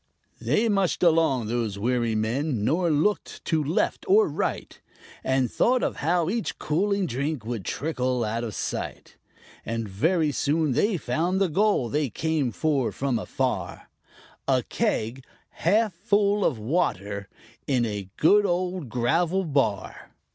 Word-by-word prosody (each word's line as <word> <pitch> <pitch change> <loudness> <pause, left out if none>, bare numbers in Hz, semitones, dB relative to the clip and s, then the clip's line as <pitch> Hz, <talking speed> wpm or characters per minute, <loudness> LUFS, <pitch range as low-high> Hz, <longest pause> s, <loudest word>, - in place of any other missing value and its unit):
They 230 - +1
mushed 195 -5 +1
along, 160 -8 +3
those 110 -3 -2
weary 120 +1 0
men, 115 +2 -1
nor 170 +6 +2
looked 160 +7 0
to 160 -3 +1
left 155 +5 0
or 420 +2 +6
right, - - -3 0.4
But 130 -2 +1
thought 250 0 +2
of - - -1
how 170 +2 +1
each 220 +4 -2
cooling 200 +5 0
drink 140 -2 -3
would 115 -4 -4
trickle 130 - -1
out 115 +2 -2
of 110 -4 -5
sight; - - -5 0.5
And 115 0 -3
very 155 - +1
soon 150 +2 +1
they 205 - +2
found 165 +8 -1
the 195 -2 +2
goal 200 - +2
they 145 +2 0
came 155 0 -1
for 140 -1 0
from 130 -4 -1
afar - - -3 0.6
_A - - +1
keg, 120 +5 -1 0.3
half 210 +4 +1
full 205 +2 +1
of 125 - +1
water, 105 - -1 0.4
in 125 -4 +2
a 100 -3 -4
good 205 +6 +5
old 180 - -1
gravel 165 - +1
bar! 135 - -2
150 Hz, 140 wpm, -25 LUFS, 120-180 Hz, 0.6 s, or